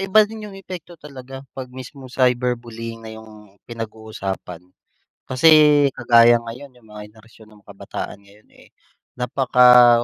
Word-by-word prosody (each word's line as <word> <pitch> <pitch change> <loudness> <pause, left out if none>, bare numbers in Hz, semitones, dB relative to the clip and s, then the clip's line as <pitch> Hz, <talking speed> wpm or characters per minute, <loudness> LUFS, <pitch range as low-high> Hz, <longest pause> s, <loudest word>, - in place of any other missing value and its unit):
iba 195 +3 +4
din 215 0 -9
yung 195 -1 -11
epekto 180 -2 -10
talaga 135 -2 -11
pag 130 -1 -8
mismo 130 +1 -11
cyberbullying 120 -2 -2
na 110 - -9
yung 105 -2 -16
pinag-uusapan. 110 -6 -7 0.6
Kasi 130 +5 +3 0.5
kagaya 120 -1 +5
ngayon 125 +3 -10
yung 120 -3 -22
mga 105 0 -10
henerasyon 110 0 -20
ng 105 - -22
kabataan 100 - -8
ngayon, 100 +2 -23
eh. - - -20 0.5
Napaka 125 -1 +5
120 Hz, 130 wpm, -20 LUFS, 110-130 Hz, 0.6 s, kagaya